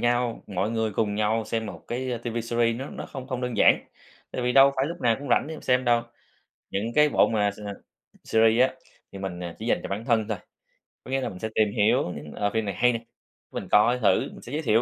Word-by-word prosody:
nhau 120 -1 0
mọi 100 +2 -1
người 110 -2 -1
cùng 105 0 0
nhau 110 +1 +1
xem 110 +1 -2
một - - -9
cái, 130 +2 -3
ơ, 120 - -2
TV 120 0 -5
series 115 0 +1
nó 135 +3 -6
nó - - -7
không 130 -2 -8
không 130 -2 -3
đơn 125 -2 -3
giản, - - +5 0.5
tại 125 - -3
vì 125 - +1
đâu 135 +1 +7
phải 130 - +1
lúc 170 +3 -6
nào 115 -2 +3
cũng 145 - -7
rảnh - - +3
để 160 - -5
mà - - -9
xem 125 0 +2
đâu. 120 -1 +3 0.7
Những 110 +4 -2
cái 150 0 +6
bộ - - +4
mà 105 -2 +1
s 100 - -13 0.7
series 115 +1 +4
á, - - -11 0.4
thì 100 - -8
mình, 95 -2 -5
ờ, 85 -1 -5
chỉ 110 - -6
dành - - +2
cho - - -5
bản 100 +3 -4
thân 115 -3 +1
thôi, - - -2 0.7
có - - -9
nghĩa 135 0 +1
là 125 - -2
mình 90 -4 -10
sẽ 110 - -3
tìm 105 -2 +3
hiểu 105 -4 +2
những, 75 0 -9
ờ, 105 - 0
phim 110 -1 0
này 100 - -2
hay 125 +6 +3
nè, - - 0
cái 115 - -23 0.6
mình - - -10
coi 120 +4 +5
thử, 110 - +4
mình - - -12
sẽ 120 - -10
giới 150 - -1
thiệu, 115 -5 +3
115 Hz, 265 wpm, -26 LUFS, 105-125 Hz, 0.7 s, đâu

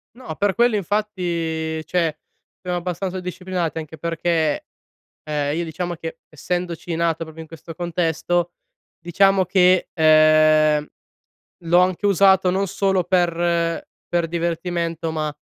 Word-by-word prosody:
No, 255 +1 -8
per 205 -2 +1
quello 240 +2 +3
infatti 170 -6 -2
cioè, 160 -2 -1 0.4
abbastanza 180 +1 -3
disciplinati 180 -2 -3
anche 160 0 -8
perché, 165 -1 -1 0.6
ehm, 150 -1 -2
io 170 - -1
diciamo 175 +2 -4
che 165 0 -7
essendoci 175 +2 -4
nato 165 -1 +1
proprio 160 0 -11
in - - -11
questo 165 +1 -10
contesto, 175 0 -1 0.5
diciamo 190 +3 +3
che, 185 0 +3
ehm, 155 -1 +5 0.8
l'ho 170 +1 +4
anche 185 +2 +1
usato 190 -1 +4
non 195 +2 0
solo 190 0 0
per 170 -1 0 0.2
per 170 -1 0
divertimento, 170 -1 -2
ma 155 -2 -3
170 Hz, 120 wpm, -21 LUFS, 160-180 Hz, 0.8 s, ehm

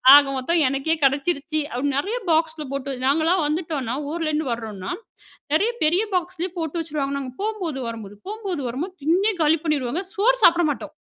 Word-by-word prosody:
ஆக 290 0 +8
மொத்தம் 330 +6 +1
எனக்கே 275 +4 0
கெடைச்சிருச்சு." 285 +3 +1
அப்படி. 255 +4 -1
நெறைய 420 +12 -1
பாக்ஸ்ல 320 -1 +1
போட்டு 275 0 -2
நாங்கலாம் 320 +5 +3
வந்துட்டோம்னா, 300 -6 -2 0.2
ஊர்லேருந்து 310 -4 -1
வரோம்னா, 215 -5 -5 0.6
நெறைய 410 +9 +3
பெரிய 345 +7 +3
பாக்ஸ்லயே 360 0 -2
போட்டு 325 +1 -2
வச்சுடுவாங்க. 290 -3 -2
நாங்க 260 -2 -6
போகும்போது, 380 -10 -2
வரும்போது 210 -3 -8
,போகும்போது, 400 -8 -3
வரும்போது, 310 +11 -4
திண்ணே 375 +8 +3
காலி 315 +1 +4
பண்ணீருவோங்க. 300 +2 0
சோறு - - +3
சாப்ட 345 0 +7
மாட்டோம். 300 +2 -6
310 Hz, 150 wpm, -23 LUFS, 275-350 Hz, 0.6 s, ஆக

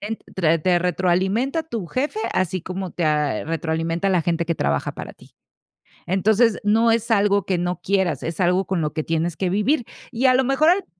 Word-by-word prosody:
te 205 - -6
en 225 - -3 0.2
te 165 -3 +2
te 175 +2 +2
retroalimenta 185 - 0
tu 230 - -5
jefe, 290 - -2
así 185 -1 -1
como 185 0 -5
te 170 - -3
ah, 150 -6 0
retroalimenta 165 +3 -2
la 180 -3 +2
gente 170 0 -1
que 170 - 0
trabaja 70 - -1
para - - -8
ti. - - -20 0.8
Entonces, 210 +5 +2
no 225 +3 +3
es 230 0 0
algo 200 -2 +2
que 185 -2 0
no 180 0 -2
quieras, 190 -7 0
es 165 0 -5
algo 180 +1 +2
con 190 -3 -1
lo 150 -1 -2
que 155 - -2
tienes 165 0 -2
que 185 -2 -1
vivir. 225 +6 +1 0.3
Y 250 +2 -1
a 255 - +6
lo 260 - +3
mejor 275 +5 +3
al 370 +2 +2
185 Hz, 205 wpm, -22 LUFS, 170-225 Hz, 0.8 s, a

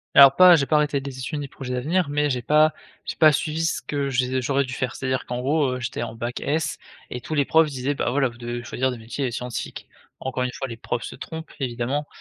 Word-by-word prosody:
Alors 140 -1 +9
pas 180 0 +9
j'ai 140 - +2
pas 150 - +3
arrêté 150 -2 +1
des 135 -1 -7
études 145 +4 -3
ni 145 - -4
projets 130 -1 -6
d'avenir 155 +6 0
mais, 145 0 +1
j'ai 125 - -1
pas 155 +4 +4 0.3
j'ai - - -4
pas 155 -2 +7
suivi 155 +3 -1
ce 165 - 0
que 140 -1 -2
j'ai 130 0 0
j'aurais 140 +1 +1
dû 125 - -7
faire. 125 -1 -2
C'est-à-dire 130 -1 -2
qu'en 125 0 -3
gros, 140 +1 +1
heu, - - -5
j'étais 120 -1 -4
en 115 -1 -4
bac 120 +2 -4
S 155 +3 -1 0.3
et 125 - -5
tous 145 +6 -4
les 140 -2 +3
profs 160 +1 +4
disaient: 135 +1 -2
«Bah, - - -1
voilà, 135 +1 +2
vous 120 -1 -10
devez 120 0 -4
choisir 130 +2 -1
des 125 - -6
métiers 120 +4 -3
scientifiques». 125 0 -5 0.3
Encore 130 -1 -2
une 125 - -1
fois, 135 - -5
les 115 -2 -7
profs 120 +1 -3
se - - -7
trompent 160 -1 -8
évidemment. 130 +3 -2
135 Hz, 250 wpm, -24 LUFS, 125-150 Hz, 0.3 s, Alors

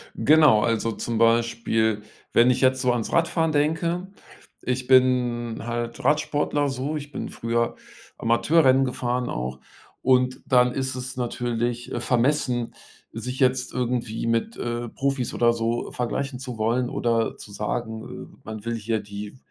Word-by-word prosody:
Genau, 150 -7 +5
also 115 0 +1
zum 115 +1 -3
Beispiel, 115 -1 +2 0.3
wenn 120 +2 +6
ich 125 - +2
jetzt 130 0 +3
so 125 - +3
ans 120 -3 -2
Radfahren 165 -1 +2
denke 165 +4 0 0.6
ich 125 0 -2
bin 125 -3 +3
halt 120 0 -4
Radsportler 145 -1 +1
so, 135 +3 -2
ich 145 0 -8
bin - - -4
früher 115 0 -1 0.4
Amateurrennen 135 +3 +4
gefahren 125 -1 -2
auch. 65 +2 -4 0.4
Und 130 0 +2
dann 125 -1 +4
ist 130 0 -2
es 130 0 -5
natürlich, 120 -1 -2
äh, - - -2
vermessen, 125 -1 +1 0.4
sich 125 +3 -5
jetzt 130 -1 +2
irgendwie 120 -2 -2
mit, 115 - 0
äh, 120 0 -3
Profis 135 -2 -2
oder 120 0 +3
so 115 +1 -2
vergleichen 125 +2 -3
zu 125 -3 -6
wollen 120 +3 +1
oder 115 -1 0
zu 100 - -11
sagen, 110 +2 -3 0.3
äh, - - -19
man 110 0 -7
will 115 0 -1
hier 110 0 -1
die 105 +2 -8
120 Hz, 150 wpm, -24 LUFS, 115-130 Hz, 0.6 s, wenn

